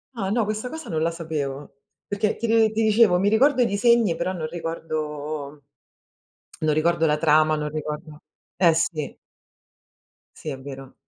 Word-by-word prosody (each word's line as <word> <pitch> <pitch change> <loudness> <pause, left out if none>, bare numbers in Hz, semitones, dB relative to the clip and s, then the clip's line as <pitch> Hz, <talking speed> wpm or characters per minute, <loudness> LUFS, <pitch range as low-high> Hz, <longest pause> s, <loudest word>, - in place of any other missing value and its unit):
Ah 195 -5 -2
no, 230 0 +1
questa 215 +4 -3
cosa 320 +2 -8
non 160 -2 -1
la 165 +1 +1
sapevo 150 -5 -5 0.3
perché 205 +1 -1
ti 230 - -2 0.2
ti 220 +1 0
dicevo, 215 -4 +4
mi 195 - +1
ricordo 255 +5 +4
i - - +5
disegni, 225 -2 +3
però 170 +2 -2
non 165 -4 -4
ricordo 155 -3 -5 1.1
non 155 - +3
ricordo 165 +2 +2
la 150 -1 +2
trama, 155 0 +4
non 150 0 -3
ricordo, 150 0 -6 0.4
eh 170 -3 +4
sì. 160 -2 -2 1.2
Sì, 155 - -7
è 135 -3 -5
vero. 135 -1 -9
165 Hz, 155 wpm, -24 LUFS, 150-205 Hz, 1.2 s, i